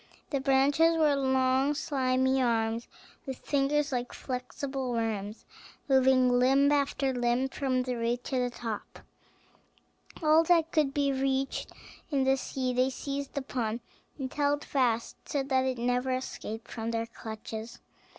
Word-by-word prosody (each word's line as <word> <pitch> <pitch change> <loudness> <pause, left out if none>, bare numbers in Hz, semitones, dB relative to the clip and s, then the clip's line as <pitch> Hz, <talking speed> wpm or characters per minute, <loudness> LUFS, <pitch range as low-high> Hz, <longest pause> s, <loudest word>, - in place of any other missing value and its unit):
The 275 -3 0
branches 285 +5 +4
were 300 -3 +4
long 265 +1 +2
slimy 260 -2 +1
arms, 230 -1 0 0.4
with 265 -1 -4
fingers 290 +1 0
like 245 -1 -2
flexible 260 +1 -4
worms, 220 -2 -3 0.4
moving 260 -2 +4
limb 270 +3 +4
after 275 -2 +1
limb 245 +2 +1
from 260 -2 0
the 250 0 -2
root 240 +1 -1
to 260 - -1
the 250 0 +1
top. 230 -3 -6 1.3
All 310 +1 +6
that 330 -1 +3
could 300 -4 +2
be 280 -1 +1
reached 270 0 -1 0.4
in 280 -4 +1
the 265 0 +4
sea 260 -1 -2
they 255 +1 +2
seized 280 +2 -5
upon, 240 -4 -2 0.4
and 260 -3 -5
held 290 0 0
fast, 240 -4 0
so 280 -2 0
that 265 -1 +1
it 260 -1 -1
never 245 +2 0
escaped 255 -3 -4
from 225 -1 -4
their 230 0 -1
clutches. 220 0 -8
260 Hz, 140 wpm, -29 LUFS, 245-275 Hz, 1.3 s, All